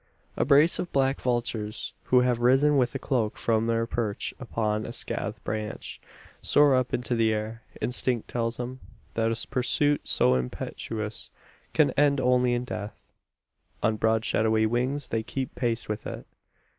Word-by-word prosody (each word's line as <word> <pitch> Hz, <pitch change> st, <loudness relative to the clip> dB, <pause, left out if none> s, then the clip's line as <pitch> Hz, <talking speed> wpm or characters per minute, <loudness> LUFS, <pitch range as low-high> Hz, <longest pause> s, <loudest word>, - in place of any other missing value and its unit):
A -, -, +1 dB
brace 150 Hz, +4 st, +5 dB
of 175 Hz, -, -3 dB
black 135 Hz, 0 st, +1 dB
vultures, 120 Hz, -4 st, -2 dB
who 125 Hz, -1 st, +5 dB
have 125 Hz, -1 st, +1 dB
risen 135 Hz, +5 st, +4 dB
with 125 Hz, -1 st, +2 dB
a -, -, +2 dB
croak 120 Hz, -6 st, -1 dB
from 115 Hz, -1 st, +1 dB
their 115 Hz, 0 st, +1 dB
perch 115 Hz, -3 st, -2 dB
upon 110 Hz, -4 st, -1 dB
a 115 Hz, -, -5 dB
scathed -, -, -4 dB
branch, 110 Hz, 0 st, -5 dB, 0.4 s
soar 145 Hz, -1 st, +5 dB
up 130 Hz, -1 st, +1 dB
into 125 Hz, 0 st, -1 dB
the 115 Hz, -1 st, +3 dB
air. 110 Hz, +1 st, -3 dB, 0.2 s
Instinct 125 Hz, -1 st, -1 dB
tells 115 Hz, -1 st, -2 dB
them, 125 Hz, +1 st, -5 dB, 0.3 s
that 115 Hz, 0 st, +1 dB
a 115 Hz, 0 st, -2 dB
pursuit 145 Hz, +3 st, +1 dB
so 65 Hz, -, +3 dB
impetuous 105 Hz, -, -4 dB, 0.4 s
can -, -, +4 dB
end 145 Hz, -1 st, +3 dB
only 125 Hz, -1 st, +3 dB
in 120 Hz, -, -1 dB
death. 105 Hz, -4 st, -7 dB, 0.7 s
On 110 Hz, -, +3 dB
broad 110 Hz, +1 st, +1 dB
shadowy 110 Hz, 0 st, +2 dB
wings 130 Hz, +5 st, -1 dB
they 115 Hz, -, 0 dB
keep 130 Hz, +3 st, -4 dB
pace 120 Hz, -2 st, -1 dB
with 105 Hz, 0 st, -4 dB
it. -, -, -7 dB
120 Hz, 160 wpm, -27 LUFS, 110-130 Hz, 0.7 s, brace